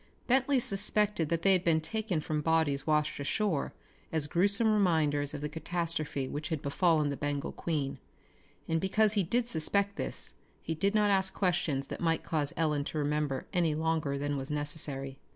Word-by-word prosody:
Bentley 265 +2 +3
suspected 205 -5 +3
that 165 0 -1
they 195 - +5
had 185 -1 +2
been 165 -2 +3
taken 195 0 -2
from 150 0 -2
bodies 160 -3 +1
washed 150 -1 +1
ashore 160 +2 -1 0.4
as 160 -2 0
gruesome 200 +8 +3
reminders 155 -8 +1
of 145 - -6
the 150 - -2
catastrophe 160 -3 -2
which 150 +2 -5
had 160 -4 -3
befallen 155 0 +2
the - - -3
Bengal 145 +1 -3
Queen, 140 -5 -3 0.7
and 165 0 0
because 215 +2 +2
he 205 - +2
did 230 +7 0
suspect 200 +3 +1
this - - -3 0.3
he 165 - -2
did 195 +6 0
not 210 -1 +3
ask 190 -1 +2
questions 165 -7 0
that - - -7
might 165 -2 +1
cause 150 -3 -1
Ellen 150 -3 +1
to 155 - -4
remember 150 -2 -1
any 170 -4 +1
longer 160 -3 -1
than 145 0 -2
was 135 0 -4
necessary. 145 -2 -1
160 Hz, 175 wpm, -30 LUFS, 145-190 Hz, 0.7 s, they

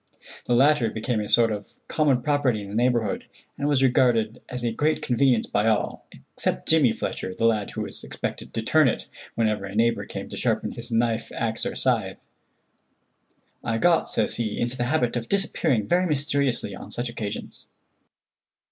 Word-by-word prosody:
The 120 - +2
latter 135 -2 +4
became 110 +2 -2
a 105 - -3
sort 115 -1 +5
of 105 -1 -6
common 140 -6 +2
property 135 -7 +1
in 100 - -9
the 100 - -6
neighborhood, 120 -3 +1 0.3
and 145 - -2
was 140 -2 +2
regarded 120 -4 +2
as 125 -1 -3
a 120 - 0
great 150 +7 +1
convenience 125 -2 +2
by 105 +2 0
all 110 -2 0 0.3
except - - -2
Jimmy 155 -7 +5
Fletcher, 95 -3 -4
the 115 - 0
lad 110 -3 +2
who - - -5
was - - -5
expected - - -5
to 115 - -1
turn 155 +4 +4
it 115 - -1 0.3
whenever 110 -3 0
a 100 +1 -8
neighbor 115 +1 +1
came - - -6
to - - -6
sharpen - - 0
his 120 +1 -8
knife, 115 0 0
axe, 115 -1 0
or - - -4
scythe. - - +1 1.4
"I 115 - -1
got," 170 +6 +3
says - - 0
he, 110 -3 -2
"into 120 +1 -1
the 120 -1 -1
habit 125 -3 +1
of 120 -1 -3
disappearing 160 - +1
very 180 +1 +2
mysteriously 140 -4 0
on - - -10
such 120 +1 -2
occasions." 110 -3 -6
120 Hz, 180 wpm, -25 LUFS, 110-140 Hz, 1.4 s, sort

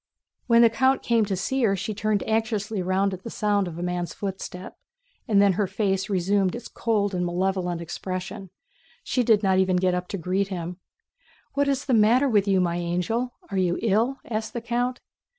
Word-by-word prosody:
When 235 -1 +6
the 230 - +7
count 260 +4 +2
came 230 -2 +2
to 200 -1 -2
see 265 +8 -1
her 205 -5 +3
she 215 +3 -3
turned 215 0 0
anxiously 220 -2 -1
round 190 +2 +1
at 185 - -7
the 230 - -7
sound 205 -3 0
of 165 -2 -7
a 175 - -4
man's 180 -1 -3
footstep, 190 -2 -6 0.5
and 210 -4 +4
then 200 -1 +5
her 200 +2 0
face 195 0 -1
resumed 195 0 +1
its 240 - -7
cold 205 -4 0
and 180 -1 -1
malevolent 180 -1 -1
expression. 185 +3 -5 0.5
She 255 - 0
did 220 -3 +3
not 190 -1 +3
even 190 -1 +2
get 180 0 +2
up 180 0 -2
to 200 - -4
greet 185 +3 -1
him. 175 -2 -5 0.8
"What 285 0 +1
is 275 -1 0
the 260 - 0
matter 230 +5 +5
with 210 -5 +2
you, 195 -1 +3
my 175 -1 +1
angel? 180 +8 -2 0.2
Are 195 - 0
you 175 -2 +1
ill?" 230 +5 +2
asked 220 -1 -4
the 235 - -3
count. 245 +1 -1
200 Hz, 200 wpm, -25 LUFS, 185-225 Hz, 0.8 s, the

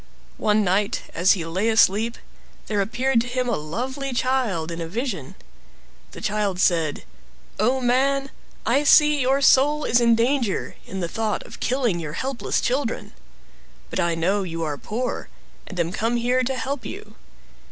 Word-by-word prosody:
One 210 0 +3
night, 200 +2 0
as 180 +3 +4
he 170 -4 -3
lay 185 +7 0
asleep, 220 +1 +3 0.5
there 210 -2 0
appeared 240 +4 +1
to 240 - -5
him 250 0 -1
a 235 - +1
lovely 255 - -4
child 240 -11 0
in 170 0 -5
a 165 - -4
vision. 200 - -4 0.7
The - - -11
child 205 -3 -1
said— 165 -5 +1 0.6
"Oh, 245 +5 +2
man! 270 +2 +1 0.3
I 265 +6 +2
see 295 0 +6
your 265 +2 +2
soul 295 +3 +5
is 240 +1 +3
in 235 -1 +5
danger, 235 -2 0
in 190 0 -5
the 170 - -1
thought 220 +3 -2
of - - -12
killing 245 -8 0
your 155 -3 -5
helpless 265 - -2
children. 250 -2 -2 0.8
But - - -2
I 170 -1 +1
know 190 +5 +1
you 165 -3 -4
are 150 -2 -2
poor, 235 - -4 0.4
and 185 - -7
am 170 0 0
come 225 +4 -1
here 245 +2 +1
to 265 +2 -1
help 270 +1 -3
you. 415 +2 -8
230 Hz, 165 wpm, -23 LUFS, 185-260 Hz, 0.8 s, see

